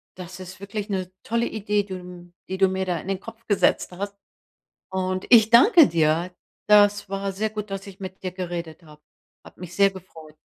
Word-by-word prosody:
Das 185 0 -9
ist 185 0 -10
wirklich 205 +1 -6
'ne 185 -2 -3
tolle 235 +1 0
Idee, 210 -1 -1
die, 195 -1 -8
hm 180 -1 -11 0.2
die 190 - -3
du 190 -1 +4
mir 190 0 -2
da 175 -2 -1
in - - -11
den 195 -1 -1
Kopf 225 0 -12
gesetzt 205 -2 +2
hast. 200 +2 -5 0.8
Und 185 0 -2
ich 220 -2 +7
danke 325 - +7
dir. 165 +2 +1 0.4
Das 205 -1 +5
war 195 0 -3
sehr 215 +3 -2
gut, 210 -1 -6
dass 195 0 -5
ich 195 0 -12
mit 190 0 -8
dir 185 - -3
geredet 175 -3 -6
habe. 150 -1 -17 0.4
Hat - - -16
mich 180 -1 -9
sehr 200 0 +5
gefreut. 165 -5 -13
190 Hz, 200 wpm, -24 LUFS, 180-205 Hz, 0.8 s, ich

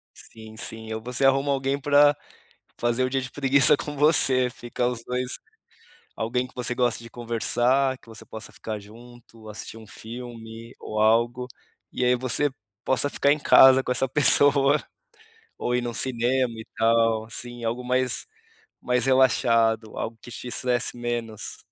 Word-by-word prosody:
Sim, 110 -1 -14
sim 110 -1 -6
ou 110 - -5
você 125 +3 -2
arruma 135 +1 +2
alguém 135 0 -1
para 145 +1 +4 0.6
fazer 120 +2 0
o 130 - -2
dia 135 0 -1
de 125 - -7
preguiça 140 0 +5
com 145 0 -7
você, 135 -4 +4
fica 120 0 -4
os 120 -2 -3
dois 125 0 -4 0.8
alguém 125 +3 -2
que - - -21
você 125 0 -2
goste 120 -2 0
de 115 - -12
conversar, 120 +3 0
que - - -23
você 110 0 -11
possa 110 - -10
ficar 110 -1 -6
junto, 115 +1 -16
assistir 110 +1 -7
um 110 - -13
filme 115 +1 -10
ou 110 0 -4
algo, 120 +3 +1 0.5
e 125 - -2
aí 125 - +3
você 130 +4 0 0.3
possa 130 +2 +1
ficar 140 +1 +2
em 150 - -1
casa 130 -2 +6
com 125 - -1
essa 135 - 0
pessoa, 145 +1 +5 0.8
ou 125 - -2
ir 125 - 0
num 120 -1 -5
cinema 125 0 0
e 110 - -9
tal 115 -1 +2
assim 120 +1 -8
algo 115 +2 -3
mais 125 0 -1 0.6
mais 125 0 0
relaxado, 115 -4 +2
algo 115 0 -5
que 120 - -12
te 125 - -8
estresse 125 0 -1
menos, 120 -3 -5
120 Hz, 165 wpm, -24 LUFS, 115-130 Hz, 0.8 s, casa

